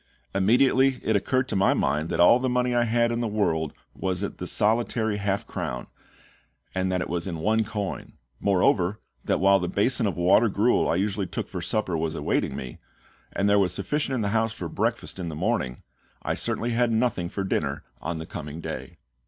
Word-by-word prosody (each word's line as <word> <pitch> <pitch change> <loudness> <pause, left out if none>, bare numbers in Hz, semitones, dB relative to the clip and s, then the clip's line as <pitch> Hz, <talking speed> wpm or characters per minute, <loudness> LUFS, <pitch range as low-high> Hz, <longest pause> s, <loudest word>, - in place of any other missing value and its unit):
Immediately 130 +6 +3
it 110 - +1
occurred 130 +6 +1
to - - -1
my 95 0 +3
mind 75 +4 0
that - - -2
all 105 +8 +7
the 130 0 0
money 125 0 +1
I 120 0 +3
had 120 +1 +2
in 120 0 -1
the 120 - 0
world 80 -8 0 0.2
was 95 -1 -2
the 95 -2 -4
solitary 110 0 +2
half 100 -1 -1
crown, 60 -1 -4 0.9
and 95 0 0
that 90 -1 0
it - - -3
was 85 +2 -2
in 85 -3 -3
one 110 +7 +2
coin; 105 -2 -5 0.3
moreover, 95 0 +2 0.2
that - - 0
while 95 +1 +5
the 90 - -2
basin 115 +2 +1
of 95 - -3
water 95 +6 +4
gruel 105 +5 +2
I - - +2
usually 100 +1 -1
took - - -4
for - - -5
supper 105 -5 -1
was 80 0 -2
awaiting 75 - -1
me, 60 -2 -7 0.5
and 100 - 0
there 100 0 +4
was 90 -2 +1
sufficient 135 +6 -1
in 120 - -1
the 100 - 0
house 115 +1 +1
for 90 - -5
breakfast 85 - -2
in 85 -2 -3
the 80 - -6
morning, 65 -4 -1 0.4
I - - 0
certainly 120 +1 0
had 120 0 +2
nothing 110 -6 0
for 100 - -3
dinner 95 - -1 0.2
on 85 - -3
the 80 - -6
coming 75 -1 -7
day. - - -6
100 Hz, 200 wpm, -26 LUFS, 90-115 Hz, 0.9 s, all